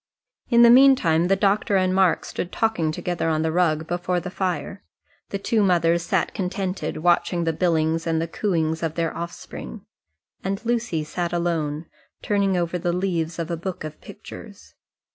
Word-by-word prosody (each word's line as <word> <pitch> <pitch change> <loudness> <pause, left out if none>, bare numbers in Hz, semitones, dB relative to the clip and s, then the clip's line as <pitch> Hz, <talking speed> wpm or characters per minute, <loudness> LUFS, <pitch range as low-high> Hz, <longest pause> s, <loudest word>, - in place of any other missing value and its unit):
In 235 -1 +6
the 235 - +8
meantime 240 -11 +5
the 195 - +3
doctor 200 +1 +1
and 185 -1 +2
Mark 190 -2 +2
stood 180 - -5
talking 220 -9 0
together 170 +1 -2
on 155 0 +1
the 160 - 0
rug 160 -2 +1
before 175 +1 -1
the 180 +1 -7
fire; 185 +1 -3 0.5
the 200 - -2
two 215 +2 0
mothers 170 -3 +3
sat - - -1
contented, 185 -3 -3
watching 175 0 +2
the 165 -1 0
billings 165 -1 0
and 165 -1 +1
the 165 - -2
cooings 160 -4 -1
of 165 -1 -2
their 165 -1 -1
offspring 170 - -8 0.6
and 195 +4 -3
Lucy 230 -9 -1
sat 170 +3 -3
alone, 165 -3 -1 0.4
turning 200 -2 +1
over 175 0 -1
the 175 +1 0
leaves 170 -3 -1
of 170 0 -4
a - - 0
book 180 +1 -5
of 155 0 -8
pictures. - - -12
175 Hz, 170 wpm, -23 LUFS, 165-190 Hz, 0.6 s, the